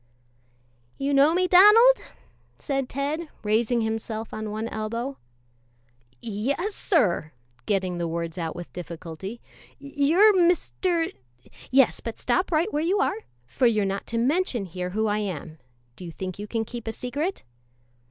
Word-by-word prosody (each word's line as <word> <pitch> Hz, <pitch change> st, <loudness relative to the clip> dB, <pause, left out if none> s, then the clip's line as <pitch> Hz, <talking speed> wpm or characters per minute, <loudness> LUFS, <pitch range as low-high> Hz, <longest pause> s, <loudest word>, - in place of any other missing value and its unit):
"You 280 Hz, +1 st, -1 dB
know 285 Hz, +4 st, +5 dB
me, 365 Hz, 0 st, +2 dB
Donald?" 420 Hz, +7 st, +7 dB, 0.6 s
said 275 Hz, -3 st, -2 dB
Ted, 295 Hz, +4 st, -3 dB
raising 225 Hz, +3 st, +1 dB
himself 220 Hz, 0 st, -3 dB
on 215 Hz, 0 st, -4 dB
one 215 Hz, +2 st, -3 dB
elbow. 230 Hz, +5 st, -4 dB, 1.0 s
"Yes, 270 Hz, -, -2 dB
sir," 210 Hz, -, +1 dB, 0.3 s
getting 185 Hz, -4 st, 0 dB
the 170 Hz, -, -1 dB
words 170 Hz, +1 st, -4 dB
out 165 Hz, -1 st, -3 dB
with 175 Hz, 0 st, -9 dB
difficulty; 175 Hz, +5 st, -7 dB, 0.4 s
"you're 295 Hz, +9 st, +4 dB
Mr. 350 Hz, -1 st, +1 dB, 0.3 s
" -, -, -34 dB, 0.3 s
"Yes, 270 Hz, -1 st, +4 dB
but 230 Hz, -1 st, -6 dB
stop 365 Hz, +1 st, 0 dB
right 335 Hz, +6 st, +1 dB
where 295 Hz, -, +1 dB
you 360 Hz, +5 st, +1 dB
are, 225 Hz, -, -1 dB, 0.2 s
for 245 Hz, -, +1 dB
you're 215 Hz, -3 st, +2 dB
not 195 Hz, 0 st, -3 dB
to 235 Hz, -, -3 dB
mention 255 Hz, -, +1 dB
here 180 Hz, 0 st, -5 dB
who 220 Hz, +4 st, -1 dB
I 210 Hz, 0 st, +1 dB
am. 165 Hz, -6 st, -5 dB, 0.4 s
Do -, -, -11 dB
you 170 Hz, -, -7 dB
think 185 Hz, +2 st, -6 dB
you 205 Hz, -, -5 dB
can 225 Hz, +1 st, -2 dB
keep 235 Hz, 0 st, -8 dB
a -, -, 0 dB
secret?" 285 Hz, -, -3 dB
230 Hz, 150 wpm, -25 LUFS, 195-310 Hz, 1.0 s, Donald